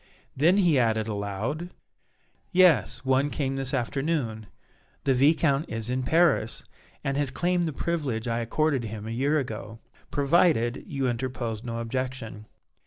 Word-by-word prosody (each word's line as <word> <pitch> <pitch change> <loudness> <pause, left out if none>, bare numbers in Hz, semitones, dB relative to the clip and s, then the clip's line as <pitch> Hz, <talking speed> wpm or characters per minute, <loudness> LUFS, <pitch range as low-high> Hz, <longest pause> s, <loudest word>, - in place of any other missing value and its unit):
Then 165 +8 +4
he 170 -8 +4
added 110 -2 +1
aloud: 110 - -3 0.8
"Yes, 135 - +4
one 130 +2 +2
came 135 -2 -2
this 135 -1 -2
afternoon. 130 -4 -1 0.6
The 135 - +3
Viscount 145 +2 +3
is 115 +1 -3
in 130 +1 0
Paris, 150 -4 +2 0.4
and 135 0 -1
has 145 -2 +1
claimed 175 +5 0
the - - -2
privilege 140 -7 -2
I 115 0 0
accorded 135 +2 0
him 110 -1 -6
a 110 - -5
year 140 +6 +1
ago, 110 -5 -5 0.3
provided 140 -4 +2
you 135 -2 -1
interposed 120 -2 -3
no 115 -2 -4
objection. 115 -3 -4
130 Hz, 140 wpm, -27 LUFS, 115-150 Hz, 0.8 s, Then